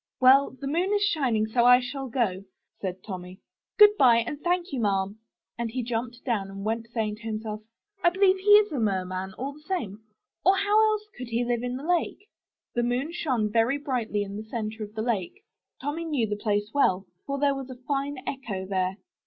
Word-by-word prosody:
Well, 260 Hz, +1 st, +5 dB
the 280 Hz, -, -6 dB
moon 340 Hz, +8 st, 0 dB
is 410 Hz, -, +2 dB
shining, 265 Hz, -, +1 dB
so 235 Hz, +2 st, +1 dB
I 245 Hz, +1 st, +8 dB
shall 265 Hz, +1 st, -5 dB
go," 200 Hz, -6 st, -1 dB, 0.3 s
said 185 Hz, -1 st, -5 dB
Tommy. 185 Hz, -2 st, -8 dB, 0.4 s
*'Good 420 Hz, 0 st, +8 dB
by, 250 Hz, -4 st, +7 dB
and 240 Hz, +6 st, -2 dB
thank 355 Hz, +1 st, 0 dB
you, 265 Hz, -, -1 dB
Ma'am;" 200 Hz, -1 st, 0 dB, 0.4 s
and 235 Hz, -1 st, -1 dB
he 250 Hz, +2 st, -3 dB
jumped 240 Hz, +1 st, -4 dB
down 210 Hz, -6 st, -1 dB
and 195 Hz, +1 st, -7 dB
went, 225 Hz, +1 st, -2 dB
saying 220 Hz, -3 st, -2 dB
to -, -, -18 dB
himself, 215 Hz, -1 st, -4 dB, 0.4 s
*'I 345 Hz, -, +7 dB
believe 380 Hz, +1 st, +3 dB
he 395 Hz, +2 st, -2 dB
is 420 Hz, 0 st, +6 dB
a 285 Hz, -, -2 dB
merman, 190 Hz, -2 st, -2 dB
all 275 Hz, +3 st, -4 dB
the 295 Hz, -, -15 dB
same, 240 Hz, -, -4 dB, 0.4 s
or 380 Hz, +2 st, +5 dB
else 390 Hz, -, +1 dB
how 430 Hz, +1 st, +4 dB, 0.2 s
could 250 Hz, 0 st, -7 dB
he 235 Hz, +1 st, -1 dB
live 240 Hz, -1 st, 0 dB
in 250 Hz, 0 st, -3 dB
the 270 Hz, -, -8 dB
lake?" 355 Hz, +4 st, -1 dB, 0.5 s
The 240 Hz, -, +1 dB
moon 245 Hz, +6 st, -1 dB
shone 255 Hz, -11 st, -1 dB
very 230 Hz, +5 st, +2 dB
brightly 245 Hz, -8 st, -2 dB
on 200 Hz, +1 st, -7 dB
the 215 Hz, -, -5 dB
center 220 Hz, 0 st, -4 dB
of 210 Hz, +1 st, -9 dB
the 220 Hz, -, -2 dB
lake. 235 Hz, -, -2 dB, 0.4 s
Tommy 295 Hz, +4 st, -3 dB
knew 290 Hz, -8 st, 0 dB
the 210 Hz, -1 st, -2 dB
place 210 Hz, 0 st, -1 dB
well, 195 Hz, -9 st, +2 dB, 0.2 s
for 280 Hz, 0 st, -2 dB
there 280 Hz, 0 st, +2 dB
was 270 Hz, -1 st, -6 dB
a 255 Hz, -, -7 dB
fine 275 Hz, +2 st, -3 dB
echo 215 Hz, -9 st, -4 dB
there. 185 Hz, 0 st, -1 dB
240 Hz, 210 wpm, -27 LUFS, 210-285 Hz, 0.5 s, I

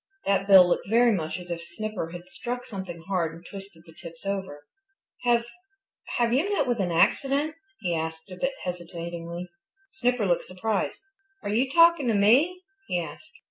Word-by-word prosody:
That 195 Hz, 0 st, +2 dB
bill 190 Hz, -3 st, +9 dB
looked 175 Hz, -, 0 dB
very 235 Hz, +2 st, +5 dB
much 160 Hz, -6 st, -1 dB
as 180 Hz, -1 st, -9 dB
if 170 Hz, 0 st, -4 dB
Snipper 180 Hz, 0 st, -5 dB
had 175 Hz, +1 st, -9 dB
struck 245 Hz, +5 st, -5 dB
something 190 Hz, -6 st, -7 dB
hard 170 Hz, -5 st, 0 dB
and 170 Hz, +1 st, -14 dB
twisted 195 Hz, -4 st, -10 dB
the 165 Hz, -, -15 dB
tips 165 Hz, +2 st, -11 dB
over. 190 Hz, -7 st, -4 dB, 0.6 s
"Have 235 Hz, -1 st, +3 dB, 0.7 s
have 235 Hz, -1 st, +2 dB
you 320 Hz, +11 st, +2 dB
met 405 Hz, -, +2 dB
with 240 Hz, -2 st, 0 dB
an 180 Hz, -3 st, 0 dB
accident?" 275 Hz, -, +2 dB, 0.3 s
he 175 Hz, -3 st, 0 dB
asked 160 Hz, +2 st, -4 dB
a -, -, -6 dB
bit 270 Hz, +8 st, -1 dB
hesitatingly. 170 Hz, 0 st, -5 dB, 0.4 s
Snipper 250 Hz, -, +1 dB
looked 175 Hz, -2 st, +1 dB
surprised. 200 Hz, -, -2 dB, 0.4 s
"Are -, -, -3 dB
you 255 Hz, +4 st, +2 dB
talking 335 Hz, -1 st, +5 dB
to 225 Hz, -, +2 dB
me?" 280 Hz, -, +4 dB, 0.2 s
he 175 Hz, -, 0 dB
asked. 240 Hz, -, -8 dB
195 Hz, 175 wpm, -26 LUFS, 170-240 Hz, 0.7 s, bill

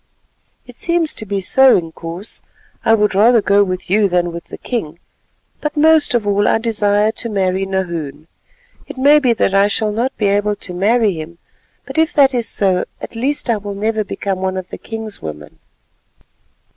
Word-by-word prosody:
"It 245 Hz, -1 st, -15 dB
seems 340 Hz, -2 st, 0 dB
to 220 Hz, -, -6 dB
be 200 Hz, 0 st, -1 dB
so, 265 Hz, +7 st, +5 dB
Inkoos, 165 Hz, +3 st, -8 dB, 0.4 s
and 225 Hz, -, +2 dB
I -, -, +7 dB
would 210 Hz, -2 st, +1 dB
rather 225 Hz, +5 st, +5 dB
go 200 Hz, -1 st, +3 dB
with 185 Hz, -1 st, -4 dB
you 200 Hz, +2 st, +2 dB
than 175 Hz, -1 st, 0 dB
with 170 Hz, 0 st, -8 dB
the -, -, -10 dB
king, 170 Hz, -10 st, -4 dB, 0.6 s
but 300 Hz, 0 st, -4 dB
most 315 Hz, -3 st, +4 dB
of 230 Hz, -3 st, 0 dB
all 205 Hz, 0 st, +1 dB
I -, -, +3 dB
desire 215 Hz, -2 st, +1 dB
to 230 Hz, +1 st, -3 dB
marry 190 Hz, -2 st, -1 dB
Nahoon. 170 Hz, -6 st, -4 dB, 0.6 s
It -, -, -9 dB
may 285 Hz, +3 st, +5 dB
be 255 Hz, -4 st, +2 dB
that 195 Hz, -3 st, 0 dB
I 195 Hz, +1 st, +4 dB
shall 210 Hz, +1 st, 0 dB
not 235 Hz, +5 st, -2 dB
be 210 Hz, -, -1 dB
able 205 Hz, +1 st, +1 dB
to 180 Hz, -, -7 dB
marry 210 Hz, +3 st, +2 dB
him, 165 Hz, +1 st, -8 dB, 0.5 s
but -, -, -3 dB
if 320 Hz, +2 st, +2 dB
that 275 Hz, -3 st, +4 dB
is 235 Hz, -3 st, -1 dB
so, 185 Hz, -3 st, 0 dB
at -, -, -9 dB
least 275 Hz, +6 st, 0 dB
I 230 Hz, -2 st, +1 dB
will 205 Hz, -1 st, -6 dB
never 215 Hz, +1 st, -1 dB
become 195 Hz, -1 st, -4 dB
one 190 Hz, 0 st, -2 dB
of 185 Hz, -1 st, -6 dB
the -, -, -7 dB
king's 220 Hz, -2 st, -7 dB
women." 75 Hz, -1 st, -9 dB
205 Hz, 195 wpm, -17 LUFS, 185-235 Hz, 0.6 s, I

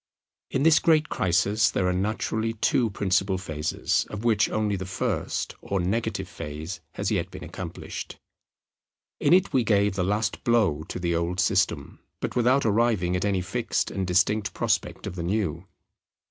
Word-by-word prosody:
In 135 Hz, -, 0 dB
this 160 Hz, 0 st, +6 dB
great 155 Hz, -2 st, +3 dB
crisis 100 Hz, +4 st, +2 dB
there 95 Hz, -, 0 dB
are 90 Hz, -, +1 dB
naturally 110 Hz, +3 st, -1 dB
two 115 Hz, +1 st, +1 dB
principal 95 Hz, -1 st, +1 dB
phases; 80 Hz, -4 st, -1 dB
of 105 Hz, +1 st, -6 dB
which 115 Hz, -3 st, +3 dB
only 105 Hz, -2 st, 0 dB
the 95 Hz, -1 st, -5 dB
first, 90 Hz, -, -2 dB
or 100 Hz, -, -2 dB
negative, 95 Hz, +1 st, -1 dB
phase 80 Hz, +1 st, -6 dB
has -, -, -2 dB
yet -, -, 0 dB
been -, -, -9 dB
accomplished. -, -, -7 dB, 1.0 s
In 145 Hz, -, +2 dB
it 185 Hz, +2 st, +4 dB
we 130 Hz, -, +3 dB
gave 100 Hz, -2 st, +2 dB
the 95 Hz, -1 st, -1 dB
last 105 Hz, +4 st, -1 dB
blow 105 Hz, -11 st, +2 dB
to -, -, -5 dB
the 85 Hz, -1 st, -1 dB
old 85 Hz, +2 st, -1 dB
system, -, -, +1 dB, 0.2 s
but -, -, -4 dB
without 125 Hz, +3 st, +3 dB
arriving 105 Hz, -5 st, +2 dB
at 90 Hz, -, -1 dB
any 100 Hz, -2 st, +1 dB
fixed 110 Hz, +7 st, -1 dB
and 95 Hz, -2 st, -2 dB
distinct 100 Hz, +4 st, +1 dB
prospect -, -, -1 dB
of -, -, -4 dB
the 90 Hz, -, -4 dB
new. 90 Hz, -1 st, -2 dB
100 Hz, 165 wpm, -26 LUFS, 90-115 Hz, 1.0 s, this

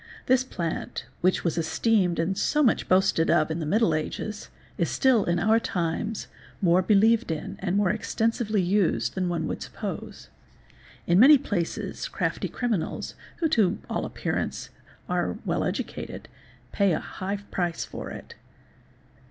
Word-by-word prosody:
This 255 Hz, 0 st, +4 dB
plantyy 170 Hz, -10 st, -4 dB, 0.2 s
which 185 Hz, +1 st, +2 dB
was 170 Hz, -1 st, 0 dB
esteemed 180 Hz, +2 st, +1 dB
and 165 Hz, +4 st, 0 dB
so 300 Hz, +9 st, +2 dB
much 240 Hz, -, +2 dB
boasted 185 Hz, -3 st, +3 dB
of 155 Hz, +1 st, +3 dB
in 160 Hz, -, -2 dB
the 155 Hz, -, -3 dB
middle 205 Hz, -1 st, +3 dB
ages, 205 Hz, +7 st, -4 dB, 0.3 s
is -, -, 0 dB
still 255 Hz, -6 st, +3 dB
in 175 Hz, 0 st, +1 dB
our 220 Hz, +5 st, +3 dB
times 190 Hz, +3 st, -2 dB, 0.3 s
more 180 Hz, -1 st, +4 dB
believed 220 Hz, +4 st, +4 dB
in 160 Hz, -2 st, -4 dB
and 190 Hz, 0 st, -1 dB
more 205 Hz, -3 st, +3 dB
extensively 220 Hz, -1 st, 0 dB
used 175 Hz, -, +1 dB
than 185 Hz, -1 st, -1 dB
one 170 Hz, -1 st, -1 dB
would -, -, -4 dB
suppose. -, -, -7 dB, 0.8 s
In 175 Hz, +2 st, +4 dB
many 285 Hz, +6 st, +9 dB
places 200 Hz, -10 st, -3 dB
crafty -, -, -2 dB
criminals, 230 Hz, -9 st, -2 dB, 0.3 s
who 325 Hz, -, +2 dB
to 210 Hz, -, +3 dB
all -, -, -1 dB
appearance -, -, -3 dB, 0.4 s
are -, -, -1 dB
well -, -, 0 dB
educated, -, -, -4 dB, 0.4 s
pay 200 Hz, -3 st, +2 dB
a -, -, 0 dB
high 195 Hz, +2 st, -4 dB
price 175 Hz, -3 st, -1 dB
for -, -, -7 dB
it. -, -, -9 dB
190 Hz, 150 wpm, -26 LUFS, 170-220 Hz, 0.8 s, many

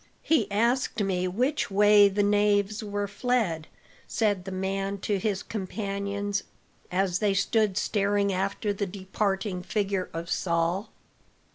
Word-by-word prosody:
"He 275 Hz, -11 st, +2 dB
asked 235 Hz, +1 st, +1 dB
me 185 Hz, -2 st, 0 dB
which 250 Hz, +11 st, 0 dB
way 205 Hz, 0 st, +6 dB
the 205 Hz, +1 st, +1 dB
knaves 205 Hz, +1 st, +2 dB
were 205 Hz, -1 st, -2 dB
fled," 205 Hz, -7 st, -1 dB, 0.4 s
said 205 Hz, -5 st, 0 dB
the 190 Hz, -, -5 dB
man 195 Hz, +1 st, -2 dB
to 205 Hz, -1 st, 0 dB
his 200 Hz, 0 st, -1 dB
companions, 200 Hz, 0 st, -3 dB, 0.5 s
as 185 Hz, 0 st, +1 dB
they 205 Hz, -2 st, +2 dB
stood 210 Hz, -1 st, +1 dB
staring 200 Hz, -1 st, +1 dB
after 195 Hz, +2 st, -1 dB
the 200 Hz, 0 st, -2 dB
departing 195 Hz, 0 st, -2 dB
figure 195 Hz, -1 st, -1 dB
of 165 Hz, +1 st, -5 dB
Saul. 170 Hz, +4 st, 0 dB
200 Hz, 130 wpm, -27 LUFS, 190-210 Hz, 0.5 s, way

